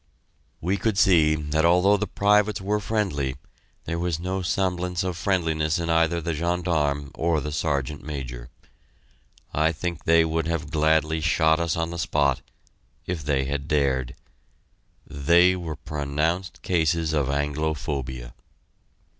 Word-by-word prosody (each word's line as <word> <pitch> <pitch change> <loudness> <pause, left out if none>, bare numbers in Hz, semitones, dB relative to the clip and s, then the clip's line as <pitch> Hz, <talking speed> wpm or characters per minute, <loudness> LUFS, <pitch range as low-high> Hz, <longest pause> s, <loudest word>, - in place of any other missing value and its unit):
We 95 +4 0
could 105 +1 -1
see 80 -6 +5
that 75 +1 -1
although 90 +4 +5
the 105 +1 -2
privates 105 +1 +2
were 105 +2 -1
friendly, 90 -12 -1 0.5
there 85 +1 -3
was 85 -2 -1
no 95 +2 -2
semblance 90 -1 -1
of 90 -2 -2
friendliness 80 -4 0
in 85 -1 -2
either 80 +1 +2
the 85 0 -2
gendarme 75 -4 -1
or 80 -1 0
the 75 +1 -4
Sergeant 75 -2 -2
Major. 65 -4 -6 1.0
I 80 +2 +2
think 85 +2 -5
they 85 0 +5
would 80 0 -1
have 80 -3 -3
gladly 80 0 +2
shot 80 0 +3
us 85 -1 -1
on 85 0 -1
the 85 - -5
spot 70 -5 +1 0.6
if 85 -4 -4
they 70 -2 0
had 70 0 -3
dared. 70 -3 0 0.9
They 85 +6 +4
were 85 -4 -5
pronounced 75 +5 -3
cases 80 -2 +1
of 75 -4 +1
anglophobia. 70 -4 -3
80 Hz, 140 wpm, -25 LUFS, 75-85 Hz, 1.0 s, see